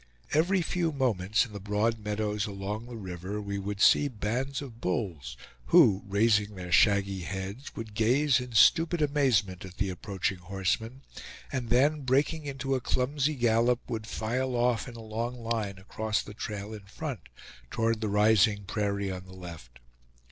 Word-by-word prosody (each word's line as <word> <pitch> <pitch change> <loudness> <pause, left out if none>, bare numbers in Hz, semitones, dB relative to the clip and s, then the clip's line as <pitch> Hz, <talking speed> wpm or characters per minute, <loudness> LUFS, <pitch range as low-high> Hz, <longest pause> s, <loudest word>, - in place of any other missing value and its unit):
Every 175 +4 +3
few 170 0 0
moments 110 -8 +1
in 110 - -13
the 100 - -6
broad 105 +3 0
meadows 105 0 -2
along 105 +3 -5
the 120 - -8
river, 95 0 -5
we 100 -1 -4
would 100 +1 -4
see 145 - +5
bands 125 +3 -2
of 120 -5 -9
bulls, 85 - -3 0.3
who, 95 +9 +6
raising 105 0 +2
their 90 -1 -7
shaggy 100 -1 +4
heads, 95 +7 -6
would 110 -2 -7
gaze 125 +6 +3
in 125 -1 -7
stupid 165 +8 +5
amazement 120 - +1
at 95 -1 -11
the 100 -3 0
approaching 95 0 -3
horsemen, 100 +8 -2 0.5
and 125 -4 -3
then 145 +5 +3
breaking 145 +4 +1
into 135 0 -2
a 130 - 0
clumsy 140 +5 0
gallop, 120 0 +3
would 110 -1 -4
file 125 +4 -2
off 120 -1 +1
in 120 - -9
a 115 - -8
long 115 +3 -3
line 110 -4 -2
across 105 +3 -2
the 105 - -10
trail 105 0 -5
in 105 -2 -9
front, 130 - -6 0.5
toward 115 -1 0
the 110 - -1
rising 105 0 +4
prairie 100 0 -2
on 90 0 -6
the 95 - -13
left. 80 -10 -10
110 Hz, 165 wpm, -29 LUFS, 100-125 Hz, 0.5 s, who